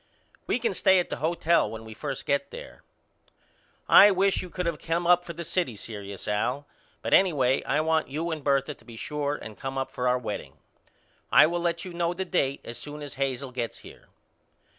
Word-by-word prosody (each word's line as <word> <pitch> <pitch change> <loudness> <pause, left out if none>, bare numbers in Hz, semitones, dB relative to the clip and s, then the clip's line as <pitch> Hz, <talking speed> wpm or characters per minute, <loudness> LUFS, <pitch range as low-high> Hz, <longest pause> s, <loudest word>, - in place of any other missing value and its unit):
We - - +2
can 230 -4 -1
stay 190 0 +4
at 180 - 0
the - - -2
hotel 170 -4 +2
when 110 +1 -8
we 110 - -9
first 135 +3 -5
get 140 - 0
there. - - -10 1.1
I 205 - +9
wish 195 0 +2
you 180 - -8
could 180 +1 -4
of 170 -3 -1
came 170 +1 -1
up 175 0 +5
for 170 - -7
the 170 +1 -6
city 170 - -1
serious 100 -2 -8
Al 125 +7 -1 0.4
but - - -1
anyway 140 -9 +4
I 145 +3 +1
want 160 0 +1
you 160 +5 -3
and 155 -3 -4
Bertha 140 +1 +1
to 125 - -23
be 115 0 -12
sure 145 +4 -2
and 110 -7 -10
come 135 0 -4
up 135 - -2
for 125 - -2
our 125 0 +3
wedding. 115 -4 -5 0.8
I - - +8
will 170 +2 -1
let 170 0 -1
you 180 - -7
know 170 0 -1
the 190 +1 -3
date 140 -7 0
as 120 - -7
soon 150 0 -8
as 145 - -7
Hazel 135 -1 -2
gets 120 -2 -4
here. - - -14
150 Hz, 210 wpm, -27 LUFS, 130-170 Hz, 1.1 s, I